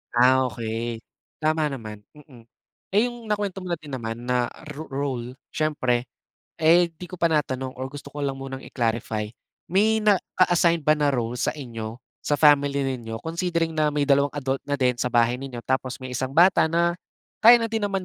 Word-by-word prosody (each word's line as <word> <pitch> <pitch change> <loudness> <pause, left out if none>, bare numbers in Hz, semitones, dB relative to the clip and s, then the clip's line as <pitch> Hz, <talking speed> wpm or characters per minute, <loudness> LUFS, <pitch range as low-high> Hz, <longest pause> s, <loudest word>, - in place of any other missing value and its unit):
Ah, 130 +1 +5
okey 115 +1 -4 0.4
tama 155 -1 +1
naman, 110 -6 -7 0.2
mm. 130 -5 -16 0.5
Eh 210 +5 +3
yung 240 -3 -7
nakwento 205 -2 -2
mo 185 - -7
na 170 - -1
din 150 -3 -11
naman 115 -3 -4
na 125 -1 +1 0.2
ro 155 +3 -8
role 130 -2 -4 0.2
siyempre 130 -5 0 0.5
eh 170 +2 +5
di 175 +2 -10
ko 185 - -8
pa 170 -1 +2
natanong 130 -4 -1
or 130 +1 -5
gusto 140 0 -10
ko 145 - -6
lang 140 -1 -2
munang 135 0 -7
i-clarify 115 -4 -2 0.5
may 220 +3 +4
na-assign 175 -4 +3
ba 155 - +5
na 150 -1 +1
role 120 -3 -1
sa - - +1
inyo 115 -5 -6 0.2
sa 145 - 0
family 145 -2 +4
ninyo 120 -4 -4
considering 165 0 -1
na 155 -1 +1
may 145 -1 0
dalawang 140 0 +3
adult 135 -1 -1
na 145 - +1
din 125 -2 +2
sa 125 - +1
bahay 120 +1 +2
ninyo 125 -3 -7
tapos 130 -1 -1
may 130 -1 -8
isang 130 +2 -3
bata 175 -1 +6
na 170 +1 +2 0.5
kaya 235 +2 +9
na 230 -1 -1
din 225 - 0
naman 195 -2 -1
140 Hz, 185 wpm, -24 LUFS, 125-165 Hz, 0.5 s, kaya